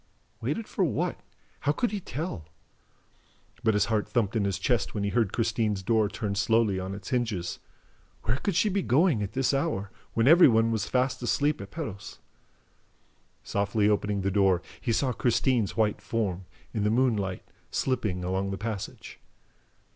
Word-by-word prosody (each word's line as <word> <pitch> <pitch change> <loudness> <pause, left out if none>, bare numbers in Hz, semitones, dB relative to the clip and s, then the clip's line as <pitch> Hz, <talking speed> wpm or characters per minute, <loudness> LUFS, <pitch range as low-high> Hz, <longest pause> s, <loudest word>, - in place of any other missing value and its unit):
Waited 150 - -2
for 195 - -1
what? 160 - -1 0.4
How 145 - +1
could 235 +8 0
he 210 - -2
tell? 140 - -5 1.2
But 110 -2 +3
his 105 - +3
heart 110 -2 -1
thumped 115 -3 0
in 105 -3 +1
his 100 -1 0
chest 120 +4 0
when 100 - -1
he 100 - 0
heard 115 -5 +1
Christine's 110 -4 0
door 110 0 +2
turn 105 -1 -3
slowly 105 -1 +2
on 95 +1 -4
its 100 -1 -8
hinges. 115 -9 -1 0.6
Where 115 +4 0
could 190 +5 -2
she 215 - +3
be 200 -1 +1
going, 150 - +3
at 100 0 -4
this 135 +1 +1
hour, 135 -9 -1 0.2
when 115 +2 +3
every 170 +4 +8
one 115 -2 +3
was 105 -3 -1
fast 130 +4 0
asleep 145 +2 +1
at 100 - -8
Perros? 100 +2 -6 1.3
Softly 100 +1 +1
opening 105 -1 +1
the 95 +1 0
door, 95 -3 +3 0.2
he 120 - -1
saw 130 +3 +1
Christine's 120 -2 +1
white 105 -2 +1
form, 95 -5 -2 0.3
in 110 -3 -1
the 105 - +2
moonlight, 110 -6 +1 0.3
slipping 110 -9 -1
along 95 +2 -1
the 95 - -3
passage. 105 -1 -6
110 Hz, 170 wpm, -28 LUFS, 100-125 Hz, 1.3 s, every